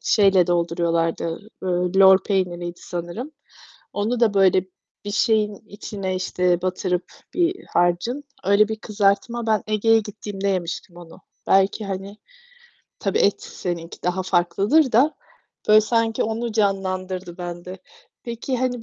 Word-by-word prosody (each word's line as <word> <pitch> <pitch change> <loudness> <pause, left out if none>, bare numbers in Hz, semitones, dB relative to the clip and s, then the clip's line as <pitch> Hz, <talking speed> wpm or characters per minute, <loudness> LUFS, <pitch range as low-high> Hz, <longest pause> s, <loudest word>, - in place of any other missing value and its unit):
şeyle 195 -4 +4
dolduruyorlardı, 170 -1 0 0.2
ııı, 180 -1 0
lor 190 -1 +8
peyniriydi 175 -3 -2
sanırım. 175 - -6 0.6
Onu 225 +4 -1
da 220 -3 +3
böyle 190 -1 +4 0.4
bir 205 - -4
şeyin 210 -1 +2
içine, 200 -2 -5
işte, 180 -1 0
batırıp 185 -1 -1 0.3
bir 360 +2 0
harcın, 175 +11 +1 0.2
öyle 200 +2 +4
bir 220 - -3
kızartma. 215 +2 0
Ben 215 -2 +2
Ege'ye 225 +1 +3
gittiğimde 205 -2 -5
yemiştim 175 -2 -3
onu. 175 -2 -13 0.3
Belki, 195 +2 +3
hani 195 +2 -6 0.8
Tabii 195 - 0
et 200 - +2
seninki 170 -2 -6
daha 180 +1 0
farklıdır 195 - +2
da 275 +8 +4 0.5
böyle 215 0 +8
sanki 225 0 +1
onu 225 +1 -3
canlandırdı 185 -3 -1
bende. 175 +1 -7 0.5
Peki, 240 +2 -3
hani, 245 -2 -1
195 Hz, 125 wpm, -22 LUFS, 180-220 Hz, 0.8 s, lor